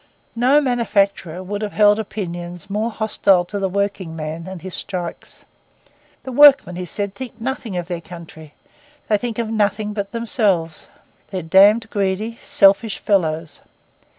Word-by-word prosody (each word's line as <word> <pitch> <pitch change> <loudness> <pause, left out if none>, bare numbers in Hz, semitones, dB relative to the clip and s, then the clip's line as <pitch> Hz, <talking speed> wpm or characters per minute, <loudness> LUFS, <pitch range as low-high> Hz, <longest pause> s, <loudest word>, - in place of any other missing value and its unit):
No 255 +5 +4
manufacturer 200 - 0
could 205 +2 -4
have 210 -1 -4
held 210 0 +4
opinions 175 -4 -6
more 215 +3 -1
hostile 205 -5 +2
to 200 +3 -5
the 195 -1 -1
working 195 -3 -2
man 160 +2 -6
and 190 -1 -7
his 185 +1 -8
strikes. 175 -3 -6 0.8
'The 260 - -6
workmen,' 275 -8 +6
he 180 0 -5
said, 200 +3 -4
'think 240 0 -9
nothing 230 -5 -4
of 175 -1 -4
their 175 -2 -4
country. 160 -3 -12 0.5
They 210 - +4
think 235 -1 -4
of 230 -2 -2
nothing 210 -1 0
but 200 -1 -4
themselves. 205 -8 -1 0.4
They're 185 -3 -4
damned 200 +7 +5
greedy, 205 +3 -2
selfish 200 +2 +3
fellows. 165 -5 -1
200 Hz, 150 wpm, -20 LUFS, 175-220 Hz, 0.8 s, workmen